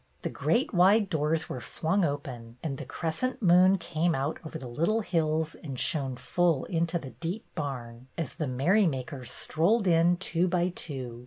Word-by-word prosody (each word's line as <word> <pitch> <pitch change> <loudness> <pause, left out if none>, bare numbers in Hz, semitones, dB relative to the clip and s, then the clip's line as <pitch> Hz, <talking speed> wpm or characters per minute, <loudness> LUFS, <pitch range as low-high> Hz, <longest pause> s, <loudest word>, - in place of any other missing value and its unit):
The - - -1
great 245 +3 +1
wide 195 +3 +5
doors 160 0 0
were 125 - -5
flung 165 - 0
open, 125 -6 -4
and 140 -5 -3
the - - -6
crescent 245 +11 -2
moon 185 +2 +6
came 170 -1 0
out 140 +3 -2
over 160 0 -6
the 130 - -8
little 170 - +1
hills 160 -4 0
and 135 -5 -7
shone 135 -6 0
full 130 +5 +1
into 170 0 0
the 135 -6 -8
deep 180 +7 -5
barn, 125 -5 -5
as 165 -5 -3
the 155 -2 -3
merrymakers 135 - +1
strolled 190 - +1
in 170 0 +4
two 175 -1 0
by 180 0 +1
two. 130 -9 -6
160 Hz, 170 wpm, -28 LUFS, 135-180 Hz, -, moon